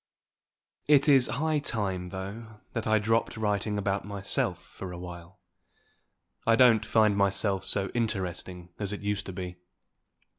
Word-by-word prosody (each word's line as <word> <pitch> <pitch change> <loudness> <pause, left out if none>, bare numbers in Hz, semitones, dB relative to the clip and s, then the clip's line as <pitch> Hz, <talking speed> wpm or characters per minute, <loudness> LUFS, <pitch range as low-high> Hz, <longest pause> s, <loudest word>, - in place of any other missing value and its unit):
It 145 0 +5
is 135 -4 +6
high 150 +4 0
time, 95 -9 -2
though, 105 +4 -7
that 115 -1 -3
I 110 0 +4
dropped 115 +2 0
writing 105 -1 0
about 100 0 -1
myself 95 -3 -1
for 90 +1 -9
a 90 - -7
while. 90 +1 -10 1.1
I 115 - +6
don't 115 -3 +6
find 110 -2 +3
my 100 0 +4
self 95 0 0
so 95 0 -1
interesting 95 -6 -3
as 100 -2 -3
it 105 - -5
used 100 0 -2
to 95 - -5
be. 90 -1 -6
100 Hz, 150 wpm, -28 LUFS, 95-110 Hz, 1.1 s, is